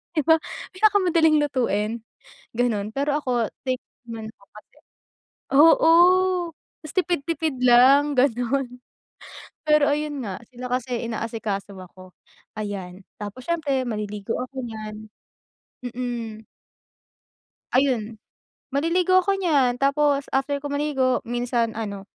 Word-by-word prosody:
di 305 - +1
ba? 320 +2 +5 0.3
Pinakamadaling 365 -6 +3
lutuin 230 -5 -1 0.6
gano'n. 215 -4 0
Pero 285 +1 0
ako 245 -5 0 0.2
thankful 255 -1 -5
naman 220 -1 -6
ako 200 - -24
kasi - - -20 0.8
oo, 325 +2 +6 0.9
mas 310 - -8
tipid-tipid 330 -4 -1
lang 265 +4 +6
gano'n. 250 +1 +1 1.0
Pero 300 -1 +5
ayun 295 -2 -2
nga 190 +1 -6
sila 250 0 -9
kasi 245 -1 -2
inaasikaso 220 -3 -4
ako, 185 0 -13 0.5
ayan. 195 -3 -5 0.2
Tapos 205 +5 -7
siyempre 290 -6 -1
maliligo 210 -2 -4
ako 260 +1 -6
nyan 215 -1 -8 0.8
mm. 235 -3 -5 1.3
Ayun, 235 -5 +1 0.5
maliligo 335 +6 +1
ako 390 +1 0
nyan 275 -9 +2
tapos 280 0 +2
after 280 +1 0
ko 290 - -6
maligo 285 -3 0
minsan 240 -1 -1
ano, 205 -3 -5
255 Hz, 110 wpm, -23 LUFS, 220-290 Hz, 1.3 s, oo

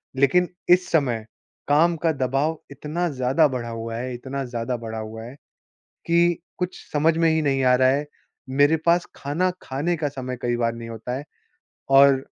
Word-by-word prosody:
लेकिन 155 +7 +3 0.2
इस 180 0 +5
समय 125 -9 +1 0.4
काम 165 +4 +4
का 160 - +4
दबाव 135 +3 0
इतना 155 +5 -3
ज़्यादा 135 +3 +2
बढ़ा 125 -4 -4
हुआ 115 0 -5
है 125 +2 -4
इतना 135 +3 -5
ज़्यादा 120 0 -3
बढ़ा 110 -1 -6
हुआ 110 +1 -7
है 120 +4 -10 0.7
कि 170 0 +3 0.2
कुछ 180 0 -4
समझ 155 +2 +2
में 165 -1 +4
ही 160 0 +1
नहीं 135 -2 +1
आ 125 0 +5
रहा 130 0 +4
है। 140 +3 +1 0.4
मेरे 145 +4 +4
पास 170 +1 +3
खाना 165 +7 0
खाने 155 +6 -1
का 150 -2 -1
समय 130 -2 -5
कई 120 0 0
बार 115 -1 0
नहीं 115 0 -8
होता 115 +2 -5
है। 140 - -6 0.7
और 135 0 +6
135 Hz, 180 wpm, -23 LUFS, 125-160 Hz, 0.7 s, और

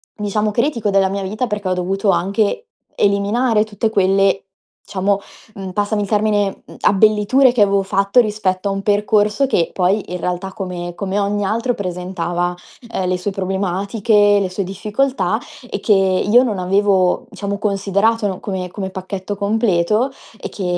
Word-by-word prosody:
diciamo, 210 0 -1
critico 235 -2 0
della 195 -1 +3
mia 195 0 -3
vita 215 +6 -2
perché 205 -3 -3
ho 185 - +2
dovuto 195 +3 -1
anche 205 - 0 0.3
eliminare 210 +3 +2
tutte 220 +1 -2
quelle 195 -1 +2 0.5
diciamo, 195 0 0 0.4
mhmm, 195 -1 -6
passami 205 +1 0
il - - -4
termine, 205 -2 0
mhmm, - - -13
abbelliture 215 +6 +4
che 240 -4 +1
avevo 200 -1 +2
fatto 195 +4 +2
rispetto 200 -3 -1
a 195 - -1
un 195 - -3
percorso 210 +4 +2
che 170 -10 +1
poi, 190 +3 +1
in 180 - -3
realtà, 180 +2 -3
come 175 -2 -5
come 200 0 -2
ogni 205 0 0
altro 230 +4 0
presentava, 180 -1 -3 0.4
ehm, 185 -4 -2
le 185 0 0
sue 190 +3 -2
problematiche, 200 +2 +1
le 190 - -1
sue 190 +2 -3
difficoltà 210 +2 -1 0.3
e 200 - -3
che 210 - +3
io 195 +4 +4
non 215 -6 -1
avevo, 195 +4 +2
diciamo, 200 -2 -4
considerato, 205 +2 +1
no, 185 -2 -4
come 185 -3 -4
come 190 -2 -4
pacchetto 190 +1 -5
completo 210 +2 +1 0.3
e - - -5
che, 195 - -7
200 Hz, 160 wpm, -18 LUFS, 190-210 Hz, 0.5 s, abbelliture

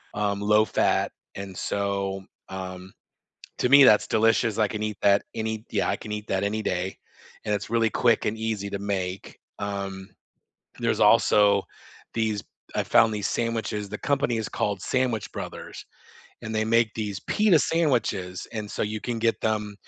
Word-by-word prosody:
um, 100 -1 0
low-fat, 105 +1 +2 0.2
and 100 -1 -7
so, 100 -1 -2 0.3
um, 95 0 -7 0.7
to - - +2
me, 140 +1 +9
that's 105 -5 +6
delicious, 115 0 +2
I 110 -2 +3
can 105 0 -4
eat 105 -1 -3
that 100 0 +5
any 110 0 -3
Yeah, - - 0
I - - +1
can 105 - -8
eat 105 0 -5
that 95 +1 0
any 110 +2 -1
day, 90 -1 -2 0.5
and 105 -1 0
it's 105 +1 -4
really 115 -1 +2
quick 120 +1 +2
and 110 +1 -1
easy 110 -3 -2
to 100 - -3
make. 95 -2 -4 0.2
Um, 100 -1 -4 0.7
there's - - 0
also 100 -1 +5 0.5
these 110 -3 -1 0.3
I - - +1
found 110 -1 +4
these 105 -1 -1
sandwiches, 110 -3 -2
the - - -5
company 135 -4 0
is 110 - -2
called 100 -2 -2
Sandwich 125 -5 -1
Brothers, - - -7 0.6
and 110 0 -5
they 110 0 +1
make 115 -1 +2
these 105 -3 -3
pita 210 -6 +3
sandwiches 115 - 0
and 105 -2 -5
so - - -3
you 110 0 -2
can 120 0 -3
get 115 0 +1
them 105 -2 -1
105 Hz, 165 wpm, -25 LUFS, 100-110 Hz, 0.7 s, me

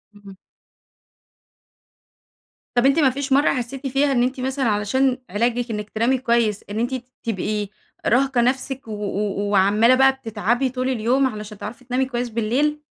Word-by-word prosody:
امم. 200 -1 -13 2.4
طب 240 +1 +3
أنتِ 275 +4 +4
ما 280 -4 +5
فيش 270 +1 -2
مرّة 285 +2 +4
حسيتِ 260 +2 -4
فيها 275 +2 +1
إن 245 -3 +2
أنتِ 255 +1 -2
مثلًا 265 +1 -1
علشان 245 +5 +1
علاجِك 235 +4 0
إنِك 210 -1 -4
تنامي 235 +5 +1
كويس، 235 -4 +1
إن 210 +2 -3
أنتِ 240 +3 -1
ت 250 -1 -7 0.2
تبقي 210 -1 -2 0.4
راهقة 260 0 +3
نفسِك 265 +1 -1
و - - -7
و 205 -1 -2
وعمالة 210 +5 +4
بقى 265 +1 +5
بتتعبي 240 +1 -1
طول 255 +1 -2
اليوم، 255 +2 +2
علشان 210 -3 -7
تعرفي 235 +5 -8
تنامي 255 +1 0
كويس 245 -1 -3
بالليل؟ 260 +7 0
245 Hz, 155 wpm, -22 LUFS, 215-265 Hz, 2.4 s, ما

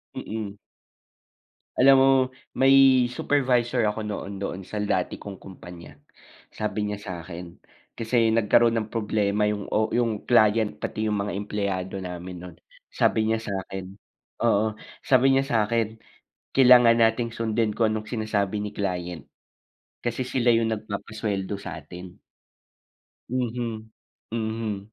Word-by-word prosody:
Mm. 105 -2 -5 1.2
Alam 135 +1 +7
mo 135 - +5 0.4
may 135 +1 +4 0.4
supervisor 125 -3 +1
ako 105 0 -4
noon 100 -1 -5
doon 95 -1 -4
sa 100 +3 -7
dati 100 -3 -1
kong 100 -2 -9
kumpanya. 90 -2 -12 0.6
Sabi 105 0 -2
niya 105 0 -4
sa 100 - -7
akin 85 0 -9 0.4
kasi 115 0 +2
nagkaroon 115 +1 +3
ng 110 -1 -3
problema 105 -1 +1
'yong 105 -1 -3
o 110 +1 +2
'yong 115 -3 0
client 110 -2 +3
pati 110 - -3
'yong 105 - 0
mga 100 0 -2
empleyado 100 -2 -3
namin 90 -1 -6
no'n. 85 -2 -11 0.4
Sabi 110 - +2
niya 110 0 0
sa 105 - -5
akin 95 -1 -7 0.6
oo, 110 +1 +2 0.2
sabi 135 0 +4
niya 135 - +4
sa 115 - +2
akin 115 0 -1 0.6
kailangan 125 -3 +7
natin 115 +1 +2
sundin 115 -1 -1
kung 110 -2 +2
anong 110 0 -5
sinasabi 105 -3 -1
ni 105 - -6
client. 90 -5 -3 0.8
Kasi 120 +1 -2
sila 125 -2 +1
'yong 115 -1 +2
nagpapasweldo 105 -1 -4
sa 100 - -7
atin. 90 0 -11 1.1
Mhm, 120 -3 -3 0.4
mhm. 110 -2 -3
110 Hz, 130 wpm, -25 LUFS, 100-115 Hz, 1.2 s, Alam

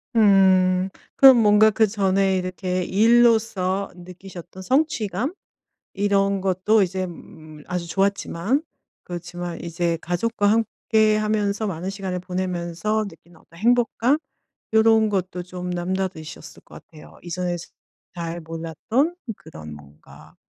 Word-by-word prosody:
음. 190 -3 +4 0.3
그럼 265 -2 +9
뭔가 215 0 +5
그전에 195 -3 +2
이렇게 185 0 -2
일로서 220 -3 +2
느끼셨던 180 0 -11
성취감 260 - 0 0.6
이런 200 -1 +1
것도 190 +3 +2
이제 185 0 -2
음 155 -3 -12
아주 180 -1 -3
좋았지만 200 - 0 0.4
그렇지만 175 0 -6
이제 170 0 -2
가족과 205 +4 -1
함께 220 0 +2
하면서 215 0 0
많은 180 0 -4
시간을 190 -2 -4
보내면서 180 +3 -2
느끼는 175 -4 -16
어떤 170 - -19
행복감? 240 +4 +2 0.6
요런 220 0 +4
것도 185 -3 -2
좀 180 0 -7
남다르셨을 180 -2 -4
것 - - -14
같아요. 155 -2 -15
이전에 175 0 -3
즈 170 - -11 0.5
잘 170 0 -4
몰랐던 165 - -2 0.2
그런 75 - -11
뭔가 75 0 -16
190 Hz, 265 characters per minute, -23 LUFS, 175-215 Hz, 0.6 s, 그럼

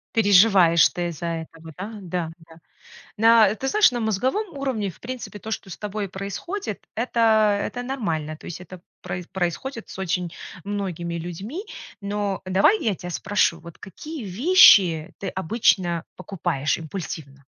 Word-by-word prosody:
Переживаешь 195 -5 +6
ты 175 -1 -3
из-за 170 0 -6
этого, 165 -1 -6
да? 205 +5 -6
Да, 175 -3 -3
да. 165 0 -17 0.6
Да, 225 -2 +6
ты 270 - -4
знаешь, 420 -2 +5
на 240 - -3
мозговом 260 - -1
уровне, 240 -9 -2
в - - -21
принципе, 245 -4 -7
то, 220 - -8
что 195 -3 -5
с - - -7
тобой 210 -1 -4
происходит, 200 - -5
это 220 -3 +3
это 245 +4 -4
нормально, 165 - -3
то - - -15
есть 175 +1 -7
это 185 0 -11 0.2
про 180 0 -5
происходит 195 +7 -3
с - - -9
очень 180 -2 -2 0.3
многими 185 -4 -4
людьми. 190 - -6 0.4
Но 200 -1 -2
давай 195 - +3
я 215 - +1
тебя 180 0 -8
спрошу: 195 -1 +1
"Вот 170 0 -13
какие 275 - -8
вещи 195 - +6
ты 195 - -3
обычно 185 -3 +1
покупаешь 155 -7 -2
импульсивно?" 155 -4 -7
195 Hz, 150 wpm, -23 LUFS, 170-225 Hz, 0.6 s, Переживаешь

